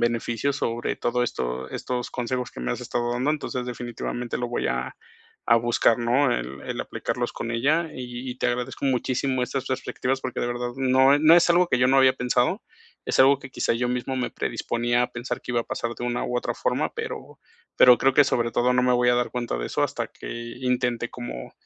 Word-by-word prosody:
beneficios, 120 +3 0
sobre 120 -3 -2
todo 125 +1 0
esto 65 - -4
estos 125 -1 -3
consejos 125 0 -3
que - - -10
me - - -1
has - - -5
estado 120 0 -2
dando. 125 +4 0
Entonces, 130 -4 -3
definitivamente 120 0 -4
lo 120 -1 -2
voy 120 - -1
a 60 +1 -3 0.5
a 115 - +6
buscar, 115 0 +3
¿no?, 125 +3 +2
el 65 +3 -4
el - - -4
aplicarlos - - -3
con 115 - -5
ella, 150 +8 +1
y 125 0 -6
y 125 - -8
te 125 - +1
agradezco 125 +3 -3
muchísimo 130 0 0
estas 135 0 -4
perspectivas 130 0 -2
porque 125 - -4
de 120 - -1
verdad 120 0 -3
no 130 +1 +5
e - - +3
no 160 +2 +7
es 175 - +4
algo 175 +1 +4
que 125 - +2
yo 125 - +4
no 135 +1 +5
había 130 -1 +5
pensado, 125 - +1 0.4
es - - 0
algo 135 +1 +6
que 135 -1 -11
quizá - - 0
yo 125 +1 0
mismo 125 +2 -2
me 125 - -1
predisponía 120 +1 -1
a 125 - -3
pensar 120 0 -4
que - - -5
iba 120 - +2
a - - -24
pasar 115 0 -3
de - - -5
una 120 0 -1
u 125 - -2
otra - - -2
forma, - - -1
pero - - -6 0.4
pero 125 -1 +8
creo 135 0 +3
que 145 - +7
sobre 120 -2 0
todo, 125 +2 +2
no 125 - +3
me 125 - +3
voy 120 0 +3
a - - +4
dar 120 0 0
cuenta 120 - -3
de - - -3
eso - - -1
hasta - - -1
que - - -11 0.3
intente 125 -2 0
como, 120 - -7
125 Hz, 225 wpm, -25 LUFS, 120-130 Hz, 0.5 s, pero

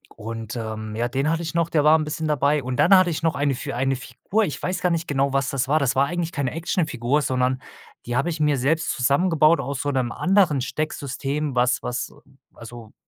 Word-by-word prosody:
und, 115 0 -6
ähm, 110 -2 -5
ja, 120 +2 -1
den 135 +4 0
hatte 165 +1 -1
ich 165 - -4
noch, 170 0 +1
der 150 -3 +2
war 155 +1 +6
'n 155 - -2
bisschen 155 +1 -3
dabei. 145 0 +1
Und 125 0 -3
dann 195 +3 +6
hatte 185 -1 +4
ich 160 - -3
noch 165 -1 +1
eine 140 0 +1
für 135 0 -5
eine 135 +1 0
Figur, 130 - -2
ich 150 - -5
weiß 185 +1 -1
gar 180 - +2
nicht 165 0 -1
genau, 140 -1 +1
was 135 0 +1
das 130 -2 -1
war. 150 - +3
Das 135 -3 0
war 135 - +5
eigentlich 170 +1 -3
keine 140 -4 -2
Actionfigur, 150 -5 -1
sondern 130 -1 0 0.4
die 120 - -3
habe 140 +7 +1
ich 160 - -4
mir 150 -2 +2
selbst 155 +6 0
zusammengebaut 155 +4 +3
aus 135 0 -3
so 145 - -1
'nem 130 -3 -1
anderen 180 -7 +2
Stecksystem, 140 0 -3
was 125 0 +2
was 125 - -4 0.4
also, 115 -1 -11
140 Hz, 225 wpm, -23 LUFS, 125-160 Hz, 0.4 s, war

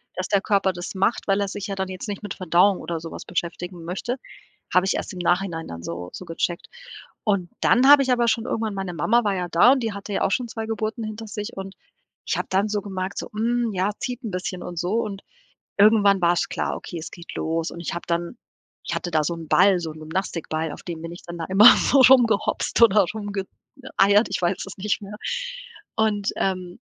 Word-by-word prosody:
dass 185 +1 -3
der 200 -1 +2
Körper 195 -2 +2
das 175 0 -6
macht, 195 +5 0
weil 195 0 +2
er 200 - 0
sich 200 +1 -5
ja 200 - -3
dann 190 0 -2
jetzt 185 +3 -6
nicht 205 0 -5
mit 205 - -4
Verdauung 185 +2 +3
oder 170 -1 -4
so 165 0 -8
was - - -8
beschäftigen 175 0 -4
möchte. 195 +8 -3 0.6
Habe 185 +1 +4
ich 195 - +1
erst - - -4
im 180 - -7
Nachhinein 175 -1 0
dann 85 0 -8
so 85 +1 -5
so 185 - -8
gecheckt. 170 +1 -3 0.6
Und 200 -6 0
dann 250 +3 +4
habe 290 -1 +9
ich 260 - 0
aber 240 -1 +3
schon 225 0 +1
irgendwann 220 -4 -2
meine 190 -2 -4
Mama 235 +8 +2
war 205 -2 +1
ja 180 -1 -2
da 175 +10 +6
und 270 - -1
die 225 - -2
hatte 200 +1 -7
ja - - -1
auch - - +1
schon 250 +2 0
2 225 -1 -5
Geburten 220 +1 -3
hinter 215 +1 -6
sich 210 +2 -6
und 195 0 -7 0.5
ich - - -1
habe - - -2
dann 195 +3 +2
so 210 -1 -1
gemerkt 190 -1 -5
so: - - -4
„Mm, 235 +1 0
ja, 190 +1 +1
zieht 250 +1 -4
'n 220 - -4
bisschen“ 180 0 -4
und 175 -1 -7
so. 180 +3 -1
Und 205 -4 -2 0.6
irgendwann 200 -2 +5
war's 175 0 +2
klar: - - -2
„Okay, 175 - -7
es 160 - -8
geht 170 -2 -10
los.“ 165 +1 -2
Und 170 - -9
ich 170 - -4
habe 170 - -5
dann 170 +6 -2 0.5
ich - - -2
hatte 175 - -3
da 155 -1 +2
so 170 - -1
'n 165 -1 -8
Ball, 185 +3 +5
so 165 -2 -5
'n 155 - -12
Gymnastikball, 160 -1 -3
auf - - -10
den 170 -2 -6
mir 165 - -6
nichts 175 +1 -11
dann 170 0 -7
da 165 - -3
immer 195 +4 +5
so 275 +1 +4
rumgehopst 240 -4 +4
oder 210 -3 +6
rumge 205 -2 -3 0.4
äh, 265 - -10
eiert, 205 +3 +5
ich - - -2
weiß 180 +2 0
es 195 - -9
nicht 210 +2 -1
mehr. 205 +1 -8 0.8
Und, 210 -2 +1
ähm, 185 -2 -2
195 Hz, 235 wpm, -23 LUFS, 175-215 Hz, 0.8 s, habe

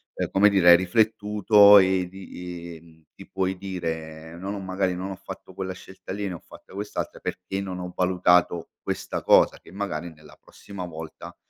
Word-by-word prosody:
ehm, - - -2
come 100 +2 +5
dire 95 -3 +4
hai 85 - +11
riflettuto 105 +1 +5
e 95 -1 +2
di 90 -2 -9 0.2
i 80 - -31
ti - - -13
puoi 95 0 -2
dire: 80 -4 -6
"No 95 +3 -6
ho 100 0 -4
magari, 95 -1 -1
non 95 +2 -5
ho - - -5
fatto 95 0 -11
quella 95 -1 -4
scelta 95 +1 -12
lì, 100 0 -3
ne 95 - -4
ho - - -9
fatta - - -16
quest'altra 105 +2 -5
perché 95 +2 -4
non 95 -2 -5
ho 90 0 -6
valutato 90 -2 +2
questa - - -4
cosa." - - +4
Che - - -17
magari 85 -4 -4
nella 75 -1 -17
prossima 100 -2 -10
volta, 80 -2 -9
95 Hz, 185 wpm, -25 LUFS, 85-100 Hz, 0.2 s, hai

